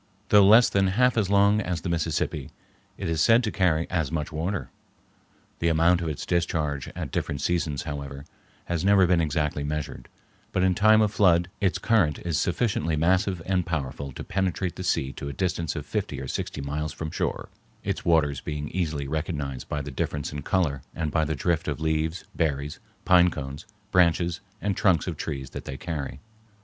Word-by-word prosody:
Though 105 -1 +7
less 115 +4 +8
than 95 -1 +2
half 125 +6 +3
as 105 -5 +1
long 100 +1 +4
as 90 -4 -3
the 90 - -3
Mississippi, 80 -2 -1 0.5
it - - -4
is 80 -2 0
said 115 +7 +5
to 110 - -1
carry 85 -4 +1
as 80 -5 0
much 75 -3 -2
water. 85 +6 -3 0.9
The 85 - +1
amount 85 +2 +4
of 85 - -2
its 75 - -4
discharge 80 -5 -1
at - - -5
different 70 - -2
seasons, 80 -4 -1
however, 70 -2 -6 0.4
has 85 -1 -2
never 100 -1 +5
been 90 -1 +3
exactly 75 -2 -1
measured, 75 -4 -4 0.4
but 90 - +2
in 95 0 +4
time 110 +3 +5
of 105 -2 +2
flood 90 -3 +3
its 95 -3 +1
current 100 -11 +2
is 80 -3 0
sufficiently 90 -4 0
massive 90 +2 +1
and 95 -2 +1
powerful 70 -4 -3
to - - -7
penetrate 95 -1 -1
the 90 - -6
sea 65 -6 0
to 70 - -6
a - - -5
distance 90 -4 -1
of - - -5
fifty - - -3
or - - -5
sixty 75 - -4
miles 75 +2 -3
from 80 +2 -5
shore, - - -2 0.3
its - - -2
waters 75 -5 +2
being 75 -1 -4
easily 80 -6 -2
recognized 75 -4 -3
by 75 -1 -2
the 70 - -6
difference 70 +3 -3
in 75 - -4
color 75 -5 0
and 80 -2 -2
by 80 0 +2
the 75 0 -1
drift 85 +4 0
of 75 -2 -2
leaves, 80 +1 -1
berries, 75 -2 -1 0.3
pine 90 -1 +6
cones, 70 -1 -7 0.2
branches, 85 0 +3 0.2
and 100 -1 0
trunks 90 -6 +3
of 90 - -3
trees 70 -3 -5
that - - -7
they 65 - -5
carry. 70 -4 -5
80 Hz, 190 wpm, -26 LUFS, 75-90 Hz, 0.9 s, less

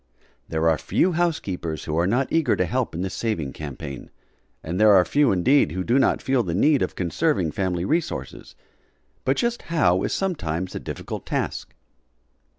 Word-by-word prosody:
There 80 +1 0
are 80 -1 +3
few 185 - +1
housekeepers 100 - -2
who 75 - -3
are 85 - +2
not 125 +6 +1
eager 165 -2 +2
to - - +1
help 125 -7 -2
in 90 - -2
this 95 - -4
saving 85 - -2
campaign, 70 -2 -7 0.5
and 90 +5 -2
there 110 -1 +7
are 90 -2 +5
few 145 - +3
indeed 95 - +3
who 95 0 -2
do 120 +7 +2
not 130 - +2
feel 130 -2 +2
the 85 -6 -3
need 140 +7 +3
of - - -1
conserving 90 - 0
family 90 -1 -1
resources. 165 - -3 0.7
But - - +2
just 240 0 0
how 95 - +3
is - - -1
sometimes 95 - -2
a - - -4
difficult - - -7
task. - - -3
95 Hz, 175 wpm, -24 LUFS, -, 0.7 s, there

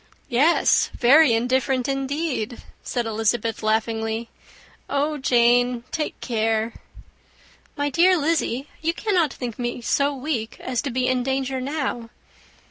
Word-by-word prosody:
"Yes, 285 +7 +3
very 270 +1 +6
indifferent, 255 +2 0
indeed," 270 -3 -2 0.2
said 240 -2 -2
Elizabeth, 225 +1 -1
laughingly. 225 +1 -1 0.6
"Oh, 295 +1 0
Jane! 245 -1 +3
take 305 -1 -3
care." 225 -1 0 1.0
"My 285 0 -1
dear 360 +6 +4
Lizzy, 290 -4 0
you 330 +2 0
cannot 360 -9 +1
think 245 -4 -6
me 240 0 -3
so 280 +4 +1
weak 260 -5 -4
as 250 -2 -2
to 280 - -3
be 255 0 -1
in 255 -1 +1
danger 265 0 -2
now." 265 -4 -3
255 Hz, 125 wpm, -23 LUFS, 235-285 Hz, 1.0 s, very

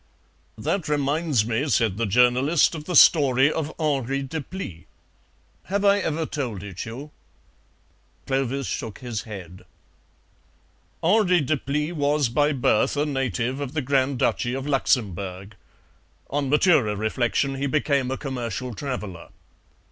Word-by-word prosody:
"That 185 -6 -2
reminds 145 -4 +1
me," 120 +6 -1
said 110 -7 +1
the 115 -1 0
journalist, 125 - +3
"of 155 -2 -7
the 180 - -3
story 140 -2 +6
of 155 -1 -3
Henri 140 -3 0
Deplis. 135 - -6 0.8
Have 200 +2 -1
I 200 0 +5
ever 160 -3 -1
told 120 -11 -4
it 95 -3 -6
you?" 135 +7 -8 1.1
Clovis 135 0 -1
shook 110 -2 -4
his 120 -4 -5
head. 90 -3 -9 1.4
"Henri 180 0 +4
Deplis 150 +2 -1
was 145 -3 +1
by 145 +5 +2
birth 130 0 +1
a 145 - +2
native 130 - -2
of 140 -1 -4
the 155 - -1
Grand 135 0 +1
Duchy 120 +1 0
of 135 0 -4
Luxemburg. 100 -8 -1 0.8
On 140 -1 -1
maturer 145 - +3
reflection 120 +6 0
he 135 +1 -2
became 140 -2 +1
a 135 - -2
commercial 125 -3 -4
traveller. 105 -9 -6
135 Hz, 130 wpm, -24 LUFS, 115-150 Hz, 1.4 s, story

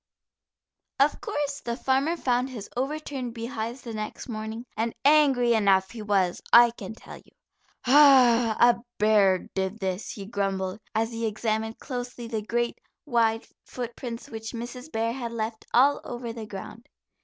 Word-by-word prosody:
Of 280 +2 +3
course 285 -1 -2
the 235 0 -3
farmer 275 +6 +1
found 250 -2 0
his 225 -6 -7
overturned 270 -2 -3
beehives, 230 +1 -5
the 230 - -6
next 215 0 -6
morning, 220 0 -5
and 225 +1 -2
angry 275 -5 +5
enough 195 -3 +3
he 230 -2 -8
was, 195 -4 +1
I 240 0 +8
can 220 -2 -8
tell - - -11
you. - - -21 0.5
"Ugh, 250 -5 +6
a 240 -1 +5 0.2
bear 205 -3 +3
did 190 +2 -2
this," 190 -1 -3
he 200 - -7
grumbled, 195 -1 -2 0.2
as 225 +1 +1
he 230 0 -2
examined 220 +1 -2
closely 245 -2 -6
the 225 -2 -3
great, 235 +2 -2 0.3
wide 230 -4 +1 0.2
footprints 240 -1 -6
which 225 0 -7
Mrs. 250 +5 -7
Bear 225 +1 -1
had 240 -2 -5
left 220 0 -4
all 275 +4 +4
over 240 -1 -6
the 225 -2 -7
ground. 210 +4 -9
230 Hz, 155 wpm, -26 LUFS, 215-250 Hz, 0.5 s, I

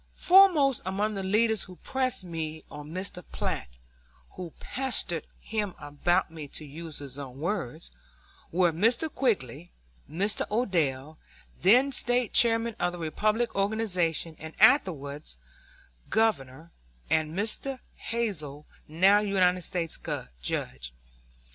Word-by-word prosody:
Foremost 345 - +5
among 200 +4 -1
the 195 - -3
leaders 215 +3 +2
who 185 - -12
pressed 255 0 -1
me 160 -3 -5
on 150 0 -9
Mr. 180 +1 -4
Platt - - -3 0.6
(who 180 -3 -7
"pestered" 245 - -2
him 210 -4 -3
about 160 +5 0
me, 155 -3 -7
to 155 - -8
use 155 +2 -7
his 140 -1 -8
own 135 -2 -8
words) 155 - -3 0.6
were 175 0 +3
Mr. 235 - +2
Quigg, 175 - -1 0.4
Mr. 195 +7 -1
Odell 160 - -1 0.4
then 250 +9 +5
State 245 -2 +1
Chairman 230 -2 +4
of 175 0 0
the - - -6
Republican 215 +8 0
organization, 185 -6 0
and 160 0 -9
afterwards 155 - +3 0.7
Governor 165 -8 0 0.4
and 155 0 +1
Mr. 225 +6 -1 0.2
Hazel, 155 -11 -3 0.2
now 190 +6 +5
United 185 -3 +2
States 170 -2 -3 0.4
Judge. 60 0 -4
180 Hz, 115 wpm, -28 LUFS, 155-220 Hz, 0.7 s, Foremost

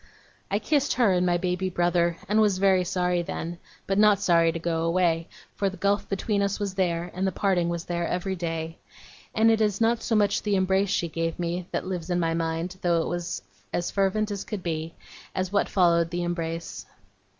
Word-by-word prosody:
I 200 - +1
kissed 285 +6 +1
her, 235 -5 +3
and 180 0 +2
my 175 0 +3
baby 180 +1 -1
brother, 175 -1 +1
and 215 +2 +3
was 205 -3 +3
very 190 -1 +4
sorry 180 0 0
then; 170 0 -5 0.3
but 195 +1 0
not 210 -2 +5
sorry 170 -3 +4
to 165 - -4
go 165 -1 -1
away, 165 -1 +1 0.3
for 200 - 0
the 190 - -9
gulf 200 +3 0
between 200 +1 0
us 200 +1 0
was 200 -2 -2
there, 175 -2 -1
and 190 +2 -1
the - - 0
parting 185 -4 +1
was 170 -1 -3
there, 170 -1 -2
every 190 +2 -2
day. 165 -2 -4 0.6
And 225 +1 +5
it 225 0 +2
is 210 -2 +1
not 230 0 +2
so 225 - 0
much 205 -1 +2
the 205 -1 0
embrace 190 +1 +2
she 170 - 0
gave 165 0 -2
me, 175 +1 -3
that - - -3
lives 180 -2 -4
in 175 0 +1
my 165 -1 +1
mind, 165 +2 -2
though 170 -2 +2
it - - -4
was 175 -1 -3 0.3
as 175 - -2
fervent 205 +2 +1
as 200 -1 -3
could 210 -5 -6
be, 160 -1 -3 0.4
as 185 0 -1
what 200 - +2
followed 170 -3 +3
the 175 0 -2
embrace. 170 -1 -4
180 Hz, 210 wpm, -26 LUFS, 170-200 Hz, 0.6 s, not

